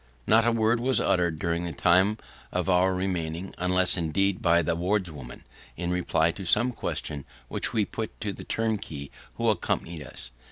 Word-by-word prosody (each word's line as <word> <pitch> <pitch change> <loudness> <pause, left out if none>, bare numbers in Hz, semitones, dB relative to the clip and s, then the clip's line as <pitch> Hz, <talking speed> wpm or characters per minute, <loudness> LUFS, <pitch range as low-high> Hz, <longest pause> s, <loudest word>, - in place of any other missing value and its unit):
Not 115 +2 +5
a - - +4
word 115 +1 +2
was 130 +2 +2
uttered 85 -3 +1
during 85 +1 -1
the 85 - -3
time 95 +7 +3 0.3
of - - -1
our 95 0 +3
remaining, 90 -1 -3
unless, 90 +1 +3
indeed, 90 +4 0
by 85 0 +4
the 80 - 0
wardswoman 85 -8 -3 0.3
in 85 +1 -2
reply 85 -2 +2
to 95 +4 -8
some 115 +7 +3
question 75 - -4 0.3
which - - 0
we 110 -2 +1
put 110 +1 -6
to 105 -2 -2
the - - -9
turnkey 100 -11 -3 0.2
who - - -1
accompanied 85 -2 -1
us. 65 -3 -10
90 Hz, 170 wpm, -27 LUFS, 85-105 Hz, 0.3 s, Not